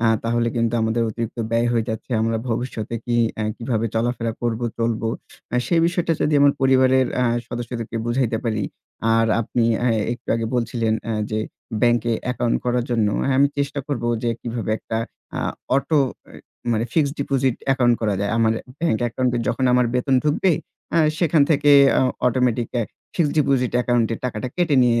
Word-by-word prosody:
অ্যা 115 - +3 0.2
তাহলে 115 0 +1
কিন্তু 115 0 +1
আমাদের 110 +1 +1
অতিরিক্ত 115 +1 -5
ব্যয় 115 +1 +2
হয়ে 115 -2 +1
যাচ্ছে। 110 +3 -5
আমরা 115 0 0
ভবিষ্যতে 115 -1 -3
কি 120 -1 0 0.2
অ্যা 110 - -2
কিভাবে 115 -2 -1
চলাফেরা 115 0 -1
করবো 120 0 -1
চলবো। 115 -1 0 0.4
অ্যা 125 - +1
সেই 170 -2 +2
বিষয়টা 170 -1 0
যদি 150 - +2
আমার 140 0 +6
পরিবারের 130 0 +4
অ্যা 125 0 +2 0.2
সদস্যদেরকে 120 -1 -5
বুঝাইতে 120 -2 0
পারি। 110 -3 -1 0.5
আর 115 0 +3
আপনি 115 +1 0 0.2
অ্যা 125 - +2 0.2
একটু 120 - -10
আগে 115 -1 -1
বলছিলেন 115 -2 0
অ্যা 115 - -2 0.2
যে 110 - -1 0.4
ব্যাংকে 120 -1 +3
অ্যাকাউন্ট 125 -1 0
করার 125 -1 +1
জন্য 115 -3 +2 0.2
হ্যাঁ, 135 -1 +1
আমি 140 - +5
চেষ্টা 140 0 -1
করব 135 -5 -3 0.2
যে 120 - +1
কিভাবে 115 -2 -4
একটা 110 - -4 0.3
অ্যা - - -3 0.3
অটো 150 +2 +1 0.3
অ্যা - - -16 0.4
মানে 110 +1 0
ফিক্সড 145 -3 +1
ডিপোজিট 135 -3 +1
অ্যাকাউন্ট 125 -3 +4
করা 105 -3 +1
যায়। 100 0 -1
আমার 110 -1 +3 0.3
ব্যাংক 165 -10 +1
অ্যাকাউন্ট 125 +2 0
এ - - 0
যখন 130 - 0
আমার 125 -1 +4
বেতন 130 +2 +1
ঢুকবে 155 +5 +2 0.4
অ্যা 165 - +4 0.2
সেখান 165 -4 +3
থেকে 145 -1 +4 0.3
অ - - +3 0.2
অটোমেটিক 125 -1 +1
অ্যা 120 - +1 0.3
ফিক্সড 155 -5 +1
ডিপোজিট 135 -4 +2
অ্যাকাউন্ট 120 -2 +2
এ - - -5
টাকাটা 125 0 -3
কেটে 175 -5 +2
নিয়ে 120 -1 +3
120 Hz, 180 wpm, -22 LUFS, 115-130 Hz, 0.5 s, আমার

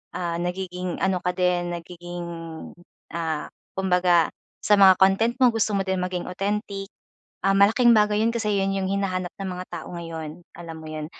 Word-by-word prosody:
ah, 170 -1 -2
nagiging 180 0 -3
ano 190 -1 +1
ka 180 - +1
din, 180 -1 +1
nagiging, 175 0 -7 0.9
ah, 160 -3 -2 0.3
kumbaga 180 -3 +3 0.4
sa 210 - +5
mga 190 -1 +8
content 195 +5 +4
mo, 250 - +7
gusto 220 -1 +1
mo 195 - +1
din 190 0 0
maging 180 -1 -3
authentic. 195 +1 -3 0.6
Ah, 195 - +4
malaking 225 +5 +5
bagay 210 0 +3
yun 230 - +1
kasi 210 -2 0
yun 195 0 0
yung 190 -1 -1
hinahanap 185 -2 -1
ng 195 -1 -3
mga 180 0 -6
tao 170 -2 -6
ngayon, 165 -1 -7 0.2
alam 165 -2 -8
mo 155 - -9
yun. 155 -1 -5
185 Hz, 170 wpm, -24 LUFS, 175-195 Hz, 0.9 s, mga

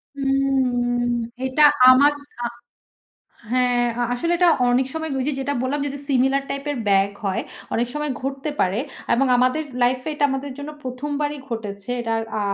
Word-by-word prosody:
হুম। 260 -3 +1 0.4
এটা 260 +3 0 0.3
আমার 280 +3 +7 0.3
আ - - 0 1.1
হ্যাঁ 250 -1 +2 0.2
আ - - +1
আসলে 290 +8 -1
এটা 355 0 +4 0.2
অনেক 250 +2 +3
সময় 320 0 -3
কি - - -2
ওই - - -2
যে - - -1
যেটা 285 +1 -1
বললাম, 265 +3 -1
যদি 285 0 -5
সিমিলার 270 +1 +2
টাইপ 275 0 -3
এর 285 - -3
ব্যাগ 195 0 +4 0.2
হয়, 190 -1 0 0.3
অনেক 235 +1 +1
সময় 300 -1 -2
ঘটতে 275 +3 -3
পারে। 190 +4 +1 0.3
এবং 270 +3 +3
আমাদের 255 +5 +2 0.2
লাইফ 250 +1 +3
এ - - 0
এটা 295 - -2
আমাদের 270 +1 -3
জন্য 285 +1 -6
১ম 255 +3 -5
বারই 295 0 -1
ঘটেছে। 205 -2 -6
এটার 225 -1 -1 0.2
আ - - 0
260 Hz, 175 wpm, -22 LUFS, 245-285 Hz, 1.1 s, আমার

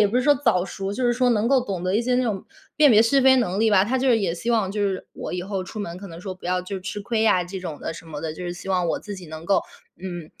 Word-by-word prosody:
也 210 - +6
不 225 +5 -1
是 250 - +3
说 290 - +6
早 185 -10 +2
熟， 195 +1 -5
就 255 - -3
是 240 - +3
说 250 0 +2
能 225 +1 +2
够 270 -2 +4
懂 195 -7 -4
得 185 +1 0
一 - - +2
些 250 +1 0
那 255 - +2
种 210 -6 -2 0.3
辨 300 -1 +7
别 220 -1 +7
是 270 +4 +3
非 265 0 +6
能 195 -6 0
力 225 +1 +3
吧。 195 -2 +5
他 255 +5 0
就 265 - +1
是 235 -3 +5
也 185 -4 0
希 230 +7 -3
望 220 -5 +2
就 205 +1 -2
是 190 -1 -4
我 - - -6
以 180 0 -2
后 195 -1 -3
出 210 +3 -7
门 170 -4 -5
可 200 - -9
能 165 -1 -10
说 190 +1 -5
不 185 - -10
要 180 0 0
就 195 +1 -5
吃 190 +2 -5
亏 220 +1 -1
呀 185 -5 +4
这 185 +2 -6
种 165 -5 -6
的 - - -4
什 165 - -11
么 150 -2 -7
的。 160 -1 -3
就 180 - -7
是 175 - -3
希 175 +2 -9
望 180 -2 +1
我 - - 0
自 205 -2 -7
己 180 - -10
能 160 +1 -9
够， 195 +3 +3 0.4
嗯， 175 -4 -6
195 Hz, 360 characters per minute, -23 LUFS, 180-230 Hz, 0.4 s, 辨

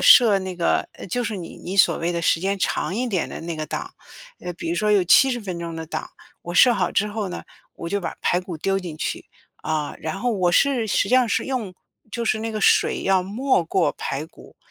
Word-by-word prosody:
设 225 -5 +7
那 185 -2 -6
个， 170 - +1
呃， - - -9
就 245 +7 -2
是 220 -3 -3
你 175 -3 -8
你 190 +3 -6
所 195 - +5
谓 170 +1 -1
的 170 -1 -2
时 165 - +2
间 195 +2 -1
长 185 - -1
一 250 +2 -1
点 190 -7 -1
的 - - -7
那 170 0 -4
个 155 -1 -4
档， - - -5 0.5
呃， - - -5
比 165 - -5
如 - - 0
说 210 +5 +1
有 200 -3 +4
70 250 +7 +5
分 185 -5 -5
钟 170 -1 -5
的 160 0 -6
档。 - - -5 0.3
我 175 - -5
设 245 +6 +6
好 185 -4 0
之 210 - +1
后 210 -1 -3
呢， 180 - -7 0.3
我 170 - -6
就 200 +3 -1
把 180 - -5
排 175 - +1
骨 180 -2 -7
丢 195 +5 0
进 170 -4 -7
去。 - - -4 0.3
啊， 155 -2 -3
然 160 +4 -4
后 245 +2 0
我 185 -4 +1
是 245 +3 +2
实 - - +2
际 - - -5
上 255 -1 +4
是 - - 0
用 245 -8 -3 0.4
就 235 +2 -3
是 220 -1 +1
那 225 +1 -3
个 215 -1 -4
水 - - +3
要 190 -1 +3
没 215 +3 +1
过 175 0 +1
排 140 +3 -4
骨， - - -17
190 Hz, 255 characters per minute, -23 LUFS, 170-220 Hz, 0.5 s, 设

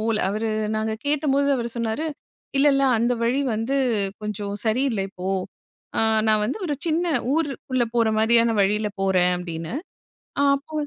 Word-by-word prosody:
போல. 225 0 0
அவரு 215 +3 -1 0.3
நாங்க 220 0 -1
கேட்டபோது 280 -1 +1
அவரு 235 -1 -2
சொன்னாரு 230 +7 -1 0.5
"இல்ல, 280 +2 +4
இல்ல 275 - +2 0.2
அந்த 240 +2 +2
வழி 250 +4 +1
வந்து 225 +6 -1 0.5
கொஞ்சம் 205 -1 -4
சரியில்ல 225 -2 +1
இப்போ. 185 0 -6 0.7
அ - - +4 0.3
நான் 215 -1 +3
வந்து 245 - -2
ஒரு 295 - -1
சின்ன 335 +2 +1 0.3
ஊரு 320 -2 +1 0.2
உள்ள 255 - +3
போற 230 -2 +3
மாரியான 230 +1 +4
வழியில 210 +2 +1
போறேன்" 185 -2 +3
அப்படின்னு. 170 +3 -5 0.7
ஆ - - +3 0.2
அப்போ 290 +3 -16
225 Hz, 155 wpm, -23 LUFS, 210-275 Hz, 0.7 s, இல்ல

